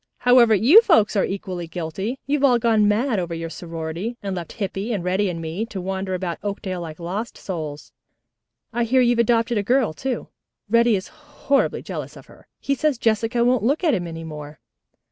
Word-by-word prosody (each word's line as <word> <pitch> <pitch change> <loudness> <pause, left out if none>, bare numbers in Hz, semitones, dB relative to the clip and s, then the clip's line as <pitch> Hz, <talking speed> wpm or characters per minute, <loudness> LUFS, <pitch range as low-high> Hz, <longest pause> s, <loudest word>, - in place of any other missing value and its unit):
However, 245 -3 +5
you 265 - +7
folks 275 - +3
are 195 - +3
equally 185 -3 -5
guilty, 180 +8 -4
you've 285 0 0
all 255 -3 +5
gone 225 -3 +3
mad 220 +1 +1
over 170 -2 -3
your 165 0 -5
sorority, 165 +7 -5
and 195 -2 -3
left 170 -3 -6
Hippy 200 +1 -3
and 200 -6 -2
Reddy 190 +2 +1
and 170 -2 -4
me 165 +6 -3
to 200 - -6
wander 190 0 -3
about 180 -2 -4
Oakdale 195 -3 -4
like 160 -1 -8
lost 195 +7 -4
souls. 155 -6 -6 0.8
I 240 - +1
hear 255 +3 +3
you've 240 -1 +3
adopted 230 -1 +2
a - - +1
girl, 240 -4 +2
too. 255 +7 -4 0.4
Reddy 230 +1 +4
is 190 - -4
horribly 295 -2 -1
jealous - - -6
of - - -13
her. - - -19
He 280 - -1
says 280 0 0
Jessica 230 +1 +1
won't 250 0 +3
look 280 - +1
at 315 -5 +3
him 175 -5 -1
any 165 0 -7
more." 150 -1 -9
205 Hz, 195 wpm, -22 LUFS, 175-240 Hz, 0.8 s, you